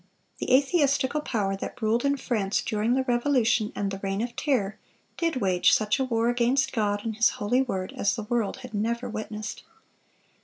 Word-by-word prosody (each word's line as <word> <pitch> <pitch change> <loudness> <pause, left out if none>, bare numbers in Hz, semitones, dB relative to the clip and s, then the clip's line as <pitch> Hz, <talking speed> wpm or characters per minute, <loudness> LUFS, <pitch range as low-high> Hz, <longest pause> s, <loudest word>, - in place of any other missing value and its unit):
The - - -2
atheistical 280 0 +3
power 205 -8 -1
that 195 - -7
ruled 225 +1 +1
in 280 0 +2
France 210 -7 -1
during 220 +3 0
the 265 - +1
Revolution 240 -3 +2
and 200 -1 -2
the 195 - -5
Reign 195 0 -2
of 240 0 -5
Terror, 220 -8 0 0.4
did 330 -2 0
wage 185 -7 +3
such 215 +3 +2
a - - +2
war 230 -2 0
against 245 +3 +2
God 205 -3 0
and 225 -1 -2
His 230 +3 +5
holy 245 +5 +2
word 190 -8 -3
as 200 - +1
the 220 - -4
world 230 -1 -1
had 250 - -11
never 235 +4 -1
witnessed. 215 -1 -5
230 Hz, 185 wpm, -26 LUFS, 210-260 Hz, 0.4 s, His